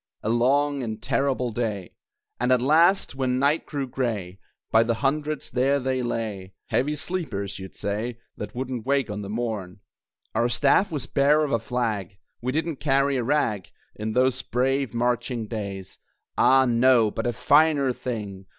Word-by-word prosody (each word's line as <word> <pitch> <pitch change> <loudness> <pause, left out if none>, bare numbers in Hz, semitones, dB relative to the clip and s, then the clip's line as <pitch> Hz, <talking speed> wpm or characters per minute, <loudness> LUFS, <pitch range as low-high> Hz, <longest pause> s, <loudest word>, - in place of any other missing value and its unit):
A 110 - -1
long 140 +4 +2
and 110 -3 -4
terrible 130 +1 0
day! 105 -5 -3 0.5
And 125 +2 +1
at 125 - +5
last, 165 +9 +3
when 130 -2 0
night 140 +4 +1
grew 140 -3 -3
gray, 110 -8 -3 0.3
By 110 - +6
the 115 0 +1
hundreds, 150 +4 -1
there 135 +3 +2
they 130 -1 -1
lay 105 -6 -4
(Heavy 150 +4 +1
sleepers, 145 - -4
you'd 95 0 -9
say), 110 +4 -3 0.2
That 105 - -7
wouldn't 125 -2 -4
wake 140 -5 +1
on 105 0 -4
the 100 - -7
morn. 105 -5 -4 0.5
Our 120 +1 +1
staff 140 - +3
was 145 -5 -3
bare 145 +2 +3
of 145 - -2
a 115 - +2
flag, 110 -6 -3 0.2
We 125 +2 -1
didn't 160 +1 -2
carry 140 -1 +2
a 125 - -1
rag 115 -8 0 0.3
In 110 +1 -4
those 130 +1 +2
brave 135 +2 0
marching 120 0 -1
days; 100 -4 -6 0.4
Ah, 130 0 +5
no, 120 -2 +4
but - - -3
a - - +1
finer 140 +2 +3
thing! 100 -7 -6
125 Hz, 165 wpm, -25 LUFS, 110-140 Hz, 0.5 s, By